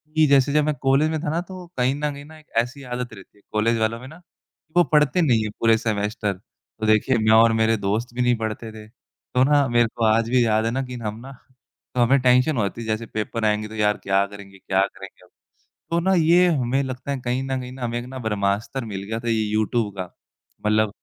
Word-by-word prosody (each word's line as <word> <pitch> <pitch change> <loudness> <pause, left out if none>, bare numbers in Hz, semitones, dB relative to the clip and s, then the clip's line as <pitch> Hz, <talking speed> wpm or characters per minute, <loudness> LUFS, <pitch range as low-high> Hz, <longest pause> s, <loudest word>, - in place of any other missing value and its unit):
कि, 155 0 +5
जैसे 140 0 +4
जब 150 0 +3
मैं 155 - +1
कॉलेज 135 +3 +3
में 160 0 -2
था 155 - -1
ना, 165 +3 -1
तो 180 0 -10
कहीं 125 +2 +1
न 150 +1 -2
कहीं 140 0 -10
ना 160 +1 -14
एक 155 - -22
ऐसी 125 +5 -1
आदत 125 -2 -5
रहती 100 0 -15
है - - -24
कॉलेज 115 +2 +1
वालों 110 +1 0
में 130 - -10
ना, 155 +4 -12
कि 165 -2 -37
वो 175 - +7
पढ़ते 150 +3 +4
नहीं 120 -9 +3
है 110 - -3
पूरे 115 -1 +4
सेमेस्टर, 105 -1 -2
तो 105 +3 -11
देखिए 110 +4 +3
मैं 110 -1 +2
और 115 0 +6
मेरे 110 0 +2
दोस्त 110 +5 -2
भी 125 - -1
नहीं 125 0 +3
पढ़ते 110 0 -4
थे, 110 -1 -11
तो 125 +2 -4
ना 145 0 +3
मेरे 120 0 +3
को 115 - -2
आज 110 +1 +2
भी 125 -1 +3
याद 110 0 +2
है 115 - 0
ना, 130 +3 -1
कि 125 -1 -7
हम 105 +1 -4
ना 130 +3 -10 0.6
तो 125 - +2
हमें 130 +4 +4
टेंशन 125 +3 +3
हो 110 - +2
जाती, 110 +4 -4
जैसे 110 +1 -2
पेपर 110 +1 -3
आएँगे 105 0 +1
तो 110 - -10
यार 105 -1 +1
क्या 100 0 +2
करेंगे, 100 -1 -12
क्या 95 +1 +1
करेंगे 95 0 -6
अब, - - -26 0.6
तो 170 - +2
ना 190 +3 +1
ये 175 +2 +5
हमें 135 -5 +1
लगता 130 +1 -5
है 140 - -2
कहीं 125 +2 -1
न 135 -1 -2
कहीं 125 0 -8
ना 130 0 -8
हमें 120 0 -2
एक 120 - -7
ना 130 +1 -8
ब्रह्मास्त्र 105 +3 -2
मिल 100 -3 -5
गया 110 +3 -4
था 120 0 -4
ये 110 -1 +1
यूट्यूब 110 +1 0
का। 95 - -2 0.6
मतलब 105 0 +3
120 Hz, 250 wpm, -23 LUFS, 110-135 Hz, 0.6 s, वो